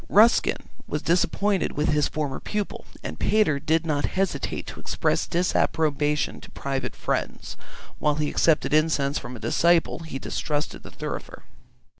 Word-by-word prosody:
Ruskin 220 +4 +4 0.2
was 150 - -3
disappointed 190 +3 +1
with 150 +1 0
his 150 -1 +3
former 145 -3 -3
pupil, 210 -1 -4 0.2
and 80 - -6
Pater 205 -9 +3
did 160 +3 +1
not 145 -3 +1
hesitate 195 0 -1
to - - -8
express - - 0
disapprobation 150 -4 +1
to - - -12
private 135 -1 -3
friends; - - -3 0.4
while 150 -1 +2
he 150 0 0
accepted 155 -2 +2
incense 150 -2 +2
from 125 - -8
a - - -9
disciple, 170 +9 +2
he 160 -5 -6
distrusted 150 +2 -3
the - - -10
thurifer. - - -6
155 Hz, 145 wpm, -25 LUFS, 145-170 Hz, 0.4 s, Ruskin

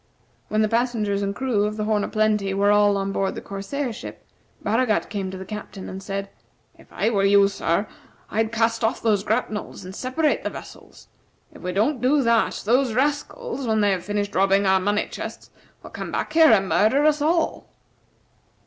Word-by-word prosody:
When 215 0 +1
the - - +2
passengers 225 -3 0
and 200 0 -2
crew 240 -5 0
of 210 0 -3
the 215 - -1
"Horn 210 -1 +1
o' - - -2
Plenty" 210 -3 +1
were 200 +1 +3
all 205 -1 +4
on 195 0 -2
board 195 0 -1
the - - -4
corsair 230 +7 -4
ship, - - -10 0.4
Baragat 225 0 +1
came 195 -3 -3
to 190 - -7
the 190 - -8
Captain, 210 -1 -8
and 190 +1 -7
said: 195 0 -5 0.4
"If - - -20
I 225 - 0
were 200 -3 +1
you, 200 0 +5
sir, 195 -1 -1 0.5
I'd 220 +1 0
cast 230 0 0
off 225 +2 0
those 210 -3 +2
grapnels, 215 -3 -3
and 185 +1 -9
separate 260 +6 0
the - - -1
vessels. - - -12 0.5
If - - -14
we 180 - -3
don't 230 +8 0
do 275 +3 +3
that 230 -1 +1
those 245 +2 +2
rascals, 290 - -2
when 220 -1 +2
they 205 -1 +3
have 185 -2 -1
finished 205 0 -2
robbing 195 +1 +3
our 190 0 +4
money 205 +2 0
chests, - - -8 0.3
will - - -11
come - - -6
back - - -3
here 320 -1 +7
and 195 -5 +4
murder 240 +10 +3
us 300 -1 +3
all." 325 +2 0
210 Hz, 195 wpm, -23 LUFS, 200-240 Hz, 0.5 s, here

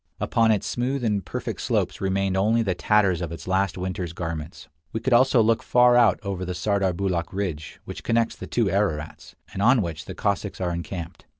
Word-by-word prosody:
Upon 115 -1 +2
its 105 -2 +2
smooth 125 +2 -2
and 105 -4 0
perfect - - -5
slopes - - -1
remained 95 0 0
only 110 +4 +2
the 95 -4 0
tatters 95 -2 +2
of 85 -2 -4
its 85 - -8
last 95 -1 0
winter's 90 -2 -4
garments. 80 -2 -6 0.2
We 110 - -2
could 130 +2 0
also 125 -1 +5
look 115 +1 +2
far 125 0 +4
out 115 -6 +5
over 95 -2 -3
the 90 0 -4
Sardarbulakh 95 -4 0
ridge, 90 -6 -4
which - - -8
connects 115 0 +1
the - - -8
two 120 - +1
Ararats, 95 -6 -2 0.2
and 95 - -4
on 120 +1 +4
which 80 -3 -5
the - - -7
Cossacks 100 0 -2
are 90 -2 -1
encamped. 85 -1 -6
100 Hz, 195 wpm, -24 LUFS, 90-110 Hz, 0.2 s, also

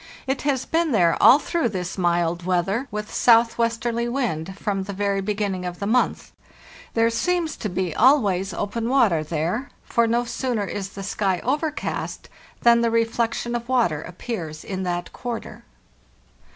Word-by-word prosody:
It 265 0 -1
has 275 -3 0
been 325 -3 +1
there 170 -6 +4
all 265 - +9
through 315 -2 -1
this 180 -3 -4
mild 175 -1 +1
weather, 185 +8 0
with 210 0 -5
southwest 230 0 +3
erly 235 0 -1
wind, 190 - -2
from 195 -1 -2
the 200 - -5
very 200 0 0
beginning 200 -2 -2
of 180 -1 -5
the 200 - -4
month. 245 +4 +1 0.6
There 230 0 +3
seems 335 +5 0
to 215 - -3
be 180 -2 -2
always 210 -8 +3
open 225 +6 -3
water 215 - +3
there, 170 - -2
for 235 0 +1
no 235 +2 +1
sooner 235 -3 -2
is 195 0 -4
the 195 - -7
sky 195 -2 0
overcast 295 +4 -2 0.3
than 235 0 +6
the 235 - +2
reflection 230 +1 0
of 240 0 -4
water 225 - +2
appears 170 -4 -6
in 190 -1 -4
that 175 0 -3
quarter. 240 -2 -6
215 Hz, 160 wpm, -23 LUFS, 185-240 Hz, 0.6 s, all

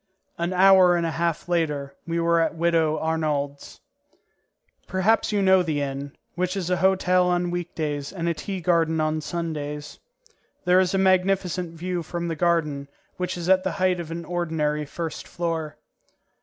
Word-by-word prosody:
An 170 +1 -1
hour 185 -1 +6
and 170 -1 0
a 165 - -1
half 170 0 -1
later 150 -5 -1
we 170 0 -1
were 170 0 +3
at 165 - 0
Widow 165 -2 +2
Arnould's. 150 -3 -2 1.1
Perhaps 195 +5 +2
you 205 -1 +1
know 190 -1 +5
the 155 -4 -1
inn, 140 0 -4 0.2
which 185 +2 -2
is 185 -2 -2
a 180 - +2
hotel 185 0 +3
on 175 0 0
week 175 -1 -4
days 145 -3 -3
and 170 -3 -3
a 170 - +2
tea 190 +3 -5
garden 165 -2 +2
on 155 0 0
Sundays. 150 -3 -5 0.7
There 180 +1 +5
is 185 0 +1
a - - +3
magnificent 185 -2 +1
view 175 +1 -3
from 170 +1 -4
the 165 - -2
garden, 155 -4 0 0.3
which 180 0 -3
is 170 0 -4
at 185 0 +4
the - - -1
height 185 -2 +1
of 170 -2 -6
an 165 0 -5
ordinary 160 -4 -1
first 165 +2 -6
floor. 165 -3 -3
170 Hz, 170 wpm, -24 LUFS, 155-180 Hz, 1.1 s, hour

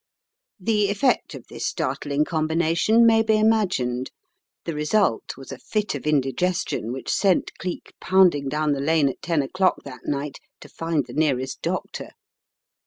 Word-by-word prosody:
The 210 0 +1
effect 205 +6 +1
of - - -10
this - - -7
startling 145 +1 -1
combination 165 +8 +2
may 225 -1 +5
be 220 -1 +2
imagined. 185 - +1 0.6
The 165 - -3
result 150 - 0
was 135 0 -10
a 135 - -7
fit 210 - -2
of 145 +1 -5
indigestion 150 -2 0
which 130 +1 -4
sent 190 -4 +1
Cleek 180 -2 -6
pounding 180 -7 +3
down 150 +1 0
the 140 - -2
lane 155 -1 +3
at 130 - -8
ten 165 -4 0
o'clock 185 +7 0
that 125 -3 -10
night 145 0 -3 0.2
to - - -12
find 165 -4 -2
the - - -11
nearest 135 -4 0
doctor. 180 +2 -4
160 Hz, 155 wpm, -23 LUFS, 140-190 Hz, 0.6 s, may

